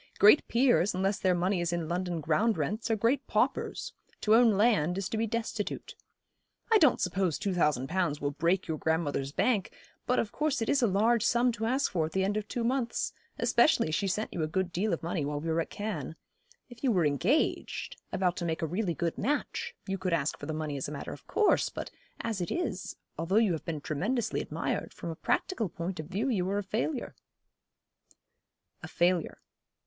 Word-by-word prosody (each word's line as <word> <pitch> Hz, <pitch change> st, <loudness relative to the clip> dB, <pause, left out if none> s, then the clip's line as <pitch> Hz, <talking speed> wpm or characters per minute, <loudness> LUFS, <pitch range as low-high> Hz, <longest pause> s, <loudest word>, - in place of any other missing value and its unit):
Great 210 Hz, +9 st, +7 dB
peers, 235 Hz, -6 st, +3 dB
unless 195 Hz, +2 st, 0 dB
their 185 Hz, -1 st, +2 dB
money 180 Hz, +1 st, +1 dB
is 170 Hz, 0 st, 0 dB
in 170 Hz, -2 st, -2 dB
London 175 Hz, -1 st, -2 dB
ground 205 Hz, +9 st, +2 dB
rents, 220 Hz, +2 st, -2 dB
are 225 Hz, -, +3 dB
great 235 Hz, +6 st, +1 dB
paupers. -, -, 0 dB, 0.3 s
To 215 Hz, -, +3 dB
own 230 Hz, -1 st, +6 dB
land 200 Hz, -6 st, +3 dB
is 195 Hz, -2 st, -2 dB
to -, -, -3 dB
be 225 Hz, +1 st, 0 dB
destitute. 225 Hz, -2 st, -3 dB, 0.8 s
I 440 Hz, -, +7 dB
don't 300 Hz, -8 st, +5 dB
suppose 180 Hz, -3 st, 0 dB
two 195 Hz, -, -1 dB
thousand 150 Hz, -7 st, +1 dB
pounds 165 Hz, -4 st, 0 dB
will 145 Hz, 0 st, -1 dB
break 170 Hz, +6 st, +1 dB
your 160 Hz, -1 st, -2 dB
grandmother's 150 Hz, -4 st, 0 dB
bank; 210 Hz, -, +1 dB, 0.4 s
but 250 Hz, -, +2 dB
of 225 Hz, -, 0 dB
course 300 Hz, 0 st, 0 dB
it 225 Hz, -, -1 dB
is 280 Hz, -, +3 dB
a 235 Hz, -, +4 dB
large 220 Hz, +4 st, +3 dB
sum 240 Hz, +1 st, +3 dB
to 225 Hz, -1 st, -3 dB
ask 265 Hz, +4 st, +1 dB
for 165 Hz, -4 st, +1 dB
at -, -, -11 dB
the 190 Hz, -, +1 dB
end 200 Hz, +2 st, 0 dB
of 215 Hz, -1 st, -2 dB
two 240 Hz, -, -2 dB
months; 240 Hz, 0 st, 0 dB, 0.2 s
especially 235 Hz, -, +3 dB
as -, -, -3 dB
she 200 Hz, +3 st, +1 dB
sent 210 Hz, +4 st, -2 dB
you 170 Hz, -, -2 dB
a 155 Hz, -, 0 dB
good 180 Hz, +3 st, -1 dB
deal 200 Hz, +5 st, 0 dB
of 165 Hz, -, -2 dB
money 165 Hz, -2 st, -1 dB
while 145 Hz, +1 st, -2 dB
we 165 Hz, +2 st, -4 dB
were 165 Hz, +1 st, +2 dB
at -, -, -5 dB
Cannes. 190 Hz, -9 st, -4 dB, 0.5 s
If 245 Hz, 0 st, -14 dB
you 260 Hz, -, +3 dB
were 180 Hz, -6 st, +3 dB
engaged 175 Hz, -, 0 dB
about 180 Hz, -2 st, +1 dB
to 175 Hz, -, -2 dB
make 165 Hz, -1 st, -2 dB
a -, -, +3 dB
really 175 Hz, +1 st, -1 dB
good 170 Hz, -1 st, -2 dB
match 460 Hz, -, -2 dB
you 195 Hz, 0 st, -3 dB
could 185 Hz, -2 st, -1 dB
ask 155 Hz, -3 st, +1 dB
for 145 Hz, -, -7 dB
the -, -, -2 dB
money 155 Hz, -2 st, -3 dB
as 135 Hz, -, -3 dB
a -, -, -6 dB
matter 145 Hz, -, -5 dB
of -, -, -13 dB
course; 430 Hz, -, +3 dB
but -, -, -6 dB, 0.3 s
as 220 Hz, -5 st, -2 dB
it 175 Hz, -, -2 dB
is, 355 Hz, -, -3 dB, 0.2 s
although 165 Hz, +4 st, 0 dB
you 220 Hz, -3 st, +5 dB
have 160 Hz, -, -3 dB
been 155 Hz, -3 st, -3 dB
tremendously 205 Hz, -, -1 dB
admired, -, -, -3 dB
from 170 Hz, -, -5 dB
a -, -, -6 dB
practical 225 Hz, -, -1 dB
point 175 Hz, +1 st, -5 dB
of 155 Hz, -, -5 dB
view 215 Hz, +8 st, -1 dB
you 190 Hz, -8 st, 0 dB
are 200 Hz, -, 0 dB
a 205 Hz, -, -1 dB
failure.' 235 Hz, +7 st, -2 dB, 1.7 s
A -, -, -7 dB
failure. 175 Hz, -1 st, +1 dB
190 Hz, 215 wpm, -30 LUFS, 165-230 Hz, 1.7 s, Great